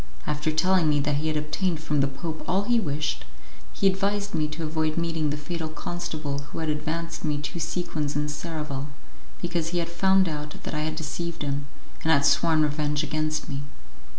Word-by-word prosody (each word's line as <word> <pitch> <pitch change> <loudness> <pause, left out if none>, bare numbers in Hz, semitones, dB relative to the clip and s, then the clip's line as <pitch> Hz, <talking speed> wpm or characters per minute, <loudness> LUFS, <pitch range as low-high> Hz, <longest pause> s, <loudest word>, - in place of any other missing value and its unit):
After 150 +1 0
telling 170 +1 +4
me 145 -1 +4
that 145 0 +1
he 155 +2 0
had 155 -1 +1
obtained 155 +3 0
from 150 -2 +1
the 140 - +4
Pope 155 +4 -5
all 190 +3 +3
he 240 +2 +3
wished, 145 - -1 0.5
he - - -1
advised 200 +1 +2
me 155 -2 +2
to 155 +2 -5
avoid 155 0 0
meeting 165 -2 +1
the 145 - -1
fatal 160 +2 -3
constable 155 -2 -3
who - - -7
had 160 -1 -1
advanced 165 +2 -2
me 150 -2 +1
two 150 +4 -4
sequins 155 -3 -1
in 150 0 +1
Seraval, 150 -2 -3 0.6
because 170 -2 0
he 175 +1 -1
had 170 -1 0
found 190 +2 +4
out 150 -1 -4
that - - -4
I 150 - 0
had 155 0 -1
deceived 165 +1 -3
him, 140 0 -1 0.3
and 160 - +3
had 140 -3 +5
sworn 160 -2 +5
revenge 150 0 +1
against 155 +1 0
me. 140 -1 -3
155 Hz, 195 wpm, -27 LUFS, 150-170 Hz, 0.6 s, had